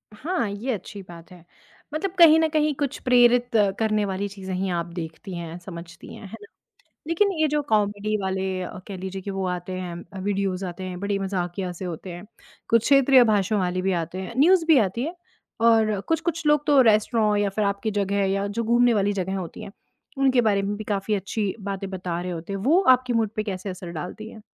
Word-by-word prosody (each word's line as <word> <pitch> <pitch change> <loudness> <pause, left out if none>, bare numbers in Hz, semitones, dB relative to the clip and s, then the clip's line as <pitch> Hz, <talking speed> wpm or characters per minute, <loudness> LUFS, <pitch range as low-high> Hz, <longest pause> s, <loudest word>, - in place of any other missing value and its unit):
हाँ, 300 - -2
ये 210 +6 -3
अच्छी 200 0 -7
बात 170 +1 -12
है। 175 -2 -15 0.5
मतलब 355 +4 -2
कहीं 320 -2 +8
न 320 - +3
कहीं 305 -1 +1
कुछ 280 -1 -2
प्रेरित 245 -1 +4 0.3
करने 215 -2 +1
वाली 195 +1 -2
चीज़ें 190 -1 -7
ही 190 +1 -1
आप 170 -2 -1
देखती 170 +3 -7
हैं, 170 0 -6
समझती 170 -2 -10
हैं। - - -11
है 190 - -15
ना? 205 - -12 0.6
लेकिन 390 +5 +2
ये 315 - +4
जो 295 0 0
कॉमेडी 210 0 +1
वाले 190 0 -2 0.2
अ, 180 - -6
कह 195 - -6
लीजिए 190 +1 -6
कि 200 +1 -5
वो 195 -1 -3
आते 180 0 -4
हैं, 180 +1 -7
वीडियोज़ 195 -1 -1
आते 180 +1 -6
हैं, 180 -1 -6
बड़े 200 0 -1
मज़ाकिया 185 -1 -3
से 175 +2 -7
होते 175 +1 -6
हैं। 175 +3 -9 0.4
कुछ 230 -1 +4
क्षेत्रीय 275 -1 +6
भाषण 210 -2 +1
वाली 185 -1 -1
भी 190 - 0
आते 170 +3 -7
हैं, 190 +5 -7
न्यूज़ 340 +3 +5
भी 320 -3 +6
आती 215 +3 0
है। 330 +5 -4 0.5
और 220 -3 +4
कुछ-कुछ 330 0 -1
लोग 295 0 +3
तो 285 -3 +6
रेस्टोरॉ 215 -1 +3
या 205 -1 +1
फिर 210 +2 -1
आपकी 200 +2 -1
जगह 200 -1 0
या 195 +1 -1
जो 215 +3 -3
घूमने 240 +1 +4
वाली 205 -1 +1
जगहें 190 0 -2
होती 175 -3 -7
हैं। - - -9 0.5
उनके 265 -2 +3
बारे 205 -3 +2
में 200 +1 -2
भी 215 - -6
काफ़ी 205 0 -2
अच्छी 200 +1 -2
बातें 195 -1 -5
बता 180 -2 -4
रहे 180 0 -4
होते 170 +3 -6
हैं। 195 - -3
वो 330 - +4
आपके 250 0 -4
मूड 225 -2 +1
पे 215 - -1
कैसे 195 -1 -5
असर 180 -1 -7
डालती 180 +7 -7
हैं? 220 - -13
200 Hz, 215 wpm, -24 LUFS, 185-235 Hz, 0.6 s, कहीं